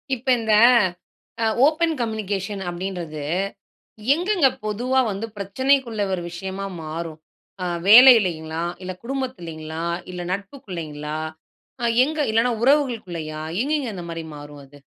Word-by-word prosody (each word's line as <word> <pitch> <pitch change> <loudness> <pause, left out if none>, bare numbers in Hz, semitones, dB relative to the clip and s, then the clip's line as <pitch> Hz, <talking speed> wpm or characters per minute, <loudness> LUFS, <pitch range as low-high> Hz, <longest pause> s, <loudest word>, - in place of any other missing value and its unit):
இப்ப 255 +2 -15
இந்த 220 -1 +1 0.9
அ - - +3 0.2
open 320 +2 +2
communication 205 -3 -3
அப்டின்றது, 175 -4 -5 0.9
எங்கங்க 355 -3 +2 0.2
பொதுவா 245 +5 +1
வந்து 200 +3 -4
பிரச்சனைக்குள்ள 235 +2 +1
ஒரு 180 -2 -2
விஷயமா 190 +3 -5 0.2
மாறும். 160 0 -5 0.5
ஆங் 175 -1 -2
வேலையிலைங்களா, 185 -10 +7 0.2
இல்ல 185 0 -4
குடும்பத்திலிங்களா, 170 - -5 0.3
இல்ல 180 - -6
நட்புக்குளைங்களா, 170 - -5 0.6
அ - - 0 0.2
எங்க 310 +2 -4
இல்லனா 230 +3 +3
உறவுகளுக்குள்ளயா, 185 - 0 0.2
எங்கங்க 290 -3 -1
அந்த 175 -2 -6
மாரி 165 -1 -5
மாறும் 145 0 -10
அது? 145 +1 -17
195 Hz, 115 wpm, -23 LUFS, 165-250 Hz, 0.9 s, வேலையிலைங்களா